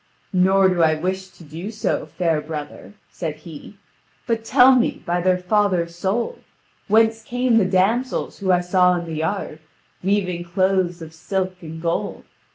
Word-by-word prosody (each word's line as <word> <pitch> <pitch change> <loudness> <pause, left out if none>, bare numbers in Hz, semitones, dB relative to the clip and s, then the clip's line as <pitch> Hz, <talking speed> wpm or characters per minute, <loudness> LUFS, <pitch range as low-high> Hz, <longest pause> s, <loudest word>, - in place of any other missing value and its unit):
"Nor 190 +1 +4
do 180 -2 +1
I 160 -1 +4
wish 190 +4 -3
to 180 - -17
do 165 +6 -7
so, 220 -1 -2
fair 165 -4 0
brother," 150 +3 -8 0.2
said 160 -4 -4
he; 155 +5 -12 0.5
"but 230 -1 -1
tell 250 +3 +6
me, 245 - 0
by 175 +1 0
thy 185 +1 +3
father's 180 -3 0
soul, 205 - -2 0.5
whence 225 +1 +3
came 245 0 +1
the 200 - +2
damsels 200 +8 0
whom 190 -2 +1
I 180 -1 +3
saw 180 0 +3
in 170 -1 -3
the 165 - -6
yard, 160 -1 -3 0.4
weaving 185 -3 0
cloths 180 -1 0
of 160 0 -11
silk 185 +3 -3
and 160 -1 -8
gold. 170 0 -2
185 Hz, 165 wpm, -21 LUFS, 170-205 Hz, 0.5 s, tell